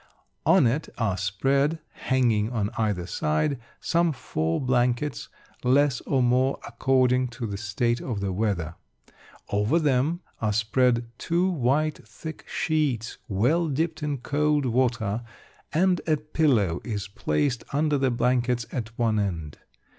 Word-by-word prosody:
On - - +6
it 130 +7 0
are 110 -5 0
spread 135 - +1
(hanging 115 -5 +1
on 110 -3 -1
either 105 -6 0
side) 85 - 0 0.2
some 170 0 +2
four 80 - -2
blankets, 125 +2 0 0.3
less 135 +1 +3
or 135 -3 +2
more 130 +2 +2
according 130 +1 +2
to 120 0 -6
the 100 -2 -4
state 110 +4 -1
of 115 -5 -3
the 100 -1 -2
weather. 90 -5 -1 0.8
Over 105 +10 +2
them 150 +2 +1 0.2
are 105 -2 +1
spread 120 +2 +2
two 175 +2 +1
white 150 +1 +1
thick 160 0 -9
sheets 145 -8 -1
well 125 - +2
dipped 155 +2 -1
in 145 -1 -1
cold 150 +2 +1
water, 120 -3 +1 0.5
and 180 +2 +2
a 155 -1 +3
pillow 140 - +1
is 105 -4 -4
placed 105 - -1
under 150 0 +1
the 135 -1 +2
blankets 125 0 +1
at 115 -4 -3
one 110 -3 +2
end. 85 -7 -3
125 Hz, 135 wpm, -26 LUFS, 105-145 Hz, 0.8 s, On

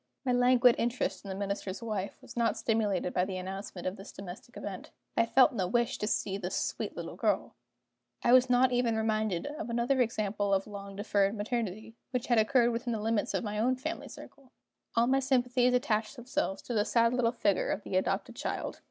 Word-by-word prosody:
My 255 - +2
languid 245 0 +5
interest 240 +1 -1
in 200 - -8
the 190 - -3
Minister's 200 +1 -4
wife 210 -4 -3
was - - -12
not 230 -2 +1
stimulated 210 -5 0
by 180 - +2
the 185 0 -3
announcement 190 0 -6
of 185 +3 -2
this 195 - -10
domestic 195 +6 -10
event. - - -6 0.3
I 230 - +3
felt 260 +3 +5
no 190 -6 0
wish 235 +4 0
to 210 - -1
see 195 -2 -1
the - - -3
"sweet - - -3
little - - -5
girl"; - - 0 0.7
I 240 - +5
was 255 0 +6
not 250 +1 +4
even 245 -2 +2
reminded 215 -5 0
of 290 -6 -5
another 240 +3 +1
example 205 -3 0
of 195 - -1
long 200 -1 -8
deferred 200 0 +1
maternity, 220 0 -3
which 250 -1 -2
had 240 -2 +3
occurred 240 +1 +4
within 235 +1 -2
the 220 - -2
limits 220 0 0
of - - 0
my 210 -1 -3
own 250 +4 +2
family 315 +6 -5
circle. 275 -3 -13 0.4
All 230 0 +4
my 265 +2 +3
sympathies 250 -2 +2
attached 215 -3 0
themselves 245 -5 -2
to 245 - -4
the 210 -2 +3
sad 230 +2 +3
little 245 -2 +2
figure 205 -5 +1
of 200 - -2
the - - -4
adopted 195 +4 0
child. - - -4
225 Hz, 205 wpm, -30 LUFS, 200-245 Hz, 0.7 s, was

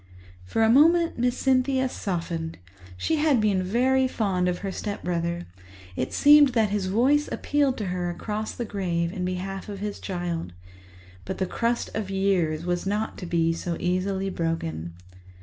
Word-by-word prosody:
For 225 - +1
a 220 - +4
moment 330 +4 +4
Miss 245 +1 +1
Cynthia 260 0 +2
softened. 170 -7 -4 0.4
She 315 - 0
had 295 -4 +3
been 205 -3 +2
very 255 +7 +2
fond 190 -7 0
of 180 - -1
her 195 - -2
stepbrother; 175 -4 -3 0.5
it 130 - -2
seemed 290 -2 +6
that 220 -3 +3
his 205 -2 -1
voice 260 +9 +2
appealed 285 -3 +1
to 210 - -3
her 175 -1 -2
across 210 +4 -4
the 240 - -3
grave 175 -5 -2
in 180 -3 -3
behalf 190 +2 -4
of 200 - -5
his 205 +1 -5
child. 175 - -4 0.7
But - - -5
the 190 - 0
crust 235 +5 -1
of 210 -3 -3
years 185 -5 0
was 175 +1 -1
not 210 +2 -1
to 180 - -6
be 165 -1 +2
so 170 0 -3
easily 190 +2 -1
broken. 85 - -3
195 Hz, 165 wpm, -25 LUFS, 175-235 Hz, 0.7 s, seemed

